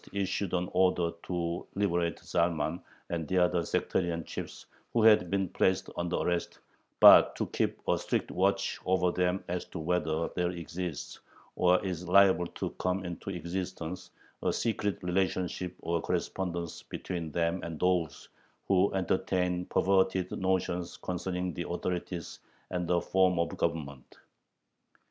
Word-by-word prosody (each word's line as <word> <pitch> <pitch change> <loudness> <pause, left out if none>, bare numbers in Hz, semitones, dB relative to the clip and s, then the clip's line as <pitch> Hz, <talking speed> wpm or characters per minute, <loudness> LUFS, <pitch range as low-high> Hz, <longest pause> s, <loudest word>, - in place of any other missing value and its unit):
issued 100 -1 -1
an 90 0 0
order 90 -2 +3
to 85 -1 -2
liberate 85 -4 0
Zalman 85 0 0 0.3
and 85 -3 -2
the 95 - 0
other 90 -1 +3
sectarian 85 -1 -1
chiefs - - -7 0.3
who 115 - +3
had 105 -5 +6
been 95 0 0
placed 95 +2 +1
under 85 0 -1
arrest, 85 -1 -1 0.4
but - - +9
to - - -1
keep - - -1
"a - - +2
strict - - -1
watch 100 +1 +1
over 90 -1 +3
them 90 +1 0
as 90 0 -3
to - - -9
whether 80 -1 0
there 90 -1 -1
exists, 85 -1 -5 0.4
or 90 +1 +3
is 90 -2 -4
liable 95 -2 +5
to - - -5
come 90 +1 -1
into 85 +2 -6
existence, 90 0 -5 0.3
a - - +1
secret 105 -4 -1
relationship 90 0 -1
or 85 0 0
correspondence 85 -2 -3
between 85 -4 -5
them 85 +3 0
and 80 -2 -6
those 90 -4 0 0.4
who 95 0 +3
entertain 90 -1 0
perverted 95 -1 +2
notions 90 -2 -1
concerning 90 0 -3
the 85 - -5
authorities 90 -1 -4 0.3
and 90 -1 -2
the 90 0 +3
form 95 0 +2
of 85 0 0
Government." 70 -5 -3
90 Hz, 140 wpm, -30 LUFS, 85-95 Hz, 0.4 s, but